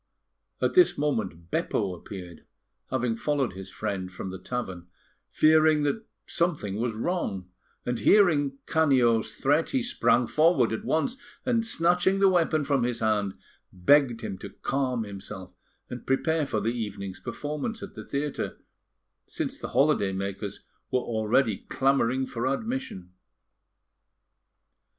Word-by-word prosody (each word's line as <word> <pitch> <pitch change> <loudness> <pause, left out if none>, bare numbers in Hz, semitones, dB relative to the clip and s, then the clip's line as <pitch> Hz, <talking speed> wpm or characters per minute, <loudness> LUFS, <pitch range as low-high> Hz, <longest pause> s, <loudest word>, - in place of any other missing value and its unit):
At - - +2
this 360 -1 +5
moment, 105 - -2
Beppo 95 -3 0
appeared, 90 -1 -9 0.5
having 125 -3 0
followed 135 -3 0
his 95 +1 -8
friend 100 -4 -4
from 95 0 -6
the 95 - -7
tavern, 95 -5 -5 0.4
fearing 155 -1 +4
that 185 +10 -1 0.2
something 150 - -1
was 115 0 -1
wrong; 110 - -2 0.3
and, 125 -1 -1
hearing 150 -9 +4
Canio's 120 -8 +3
threat, 145 +4 +2
he 265 -2 0
sprang 130 - +2
forward, 155 -5 +3
at 110 - -4
once, 240 +11 0 0.3
and 235 -3 +2
snatching 180 -2 +2
the 195 0 +5
weapon 165 -4 +2
from 140 -2 +1
his 120 -1 -1
hand, 105 -3 0 0.4
begged 120 +5 +3
him 95 -5 -5
to - - -7
calm 130 -4 -1
himself 100 -2 -8 0.3
and 125 - -8
prepare 155 +3 +1
for 110 - -1
the 105 +2 0
evening's 100 -5 -5
performance 150 - -4
at 200 - -8
the - - -8
theatre, 140 0 -3 0.7
since - - -3
the - - -5
holiday 140 -9 +3
makers 100 +1 -4 0.3
were 130 - +2
already 110 -1 +1
clamouring 130 -1 +2
for 125 0 -3
admission. 135 - -3
125 Hz, 135 wpm, -27 LUFS, 105-155 Hz, 0.7 s, this